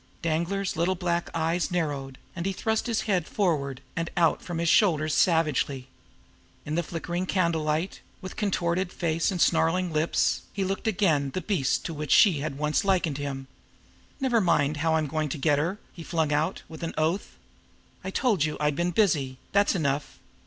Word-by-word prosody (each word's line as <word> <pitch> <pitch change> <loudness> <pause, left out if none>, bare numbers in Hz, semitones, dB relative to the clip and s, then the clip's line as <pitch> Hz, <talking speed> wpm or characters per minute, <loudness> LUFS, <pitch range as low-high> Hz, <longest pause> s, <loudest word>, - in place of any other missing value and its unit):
Danglar's 170 +4 -1
little 170 +3 +1
black 175 -1 -1
eyes 165 +2 0
narrowed, 145 -7 -2 0.2
and 170 +1 -3
he 195 - -1
thrust 220 +4 -1
his 230 -2 0
head 185 -6 0
forward 140 -9 -1
and 165 0 -2
out 165 -2 +3
from 175 -2 -5
his 170 0 0
shoulders 155 -4 +3
savagely. 150 -6 +1 0.8
In 150 - -4
the 170 - +2
flickering 175 +2 -4
candle 170 -4 +1
light, 155 +4 -2 0.2
with 185 -1 -8
contorted 180 -3 0
face 165 -1 0
and 185 -3 -2
snarling 170 +1 +2
lips, 155 +2 +1
he 200 - -1
looked 195 +4 -2
again 170 -10 +2
the - - +1
beast 170 -8 0
to 165 - -3
which 150 -1 -5
she 185 -9 +6
had 140 -1 -4
once 150 +1 +1
likened 175 -7 +1
him. 135 -2 -4 0.7
"Never 250 -4 +2
mind 150 -5 +2
how 160 +1 +1
I'm 155 -1 +1
going 155 +1 -2
to 150 - -3
get 145 0 +2
her!" 170 +7 -1 0.2
he 170 - -10
flung 160 -2 0
out, 150 +2 0
with 160 - -10
an 165 - -4
oath. 165 +6 -1 0.7
"I 190 - -3
told 205 - +1
you 155 -1 -1
I'd 150 -1 +1
been 175 +3 0
busy. 150 -10 +1
That's 200 0 +3
enough! 145 -4 -1
165 Hz, 180 wpm, -27 LUFS, 150-185 Hz, 0.8 s, she